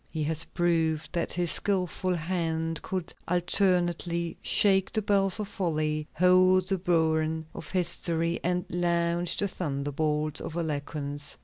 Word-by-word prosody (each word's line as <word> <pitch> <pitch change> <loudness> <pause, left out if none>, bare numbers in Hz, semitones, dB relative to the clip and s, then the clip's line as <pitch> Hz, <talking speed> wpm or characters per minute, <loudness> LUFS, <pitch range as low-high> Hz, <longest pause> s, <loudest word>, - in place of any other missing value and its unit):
He 155 -2 -3
has 160 +2 -1
proved 165 -3 0
that 170 -2 -2
his 175 -2 +1
skilful 185 -2 0
hand 165 -1 -2
could 185 -3 -4
alternately 175 -1 +1
shake 195 -2 +3
the 215 - -1
bells 195 -1 +3
of 210 - -3
folly, 155 -6 -2
hold 185 +1 +4
the 195 -2 0
burin 160 -2 +1
of 155 - -8
history, 170 -2 0
and 180 +1 0
launch 170 0 0
the 205 - +1
thunderbolts 150 -2 -2
of 155 - -6
eloquence. 145 -2 -3
170 Hz, 130 wpm, -28 LUFS, 160-180 Hz, -, hold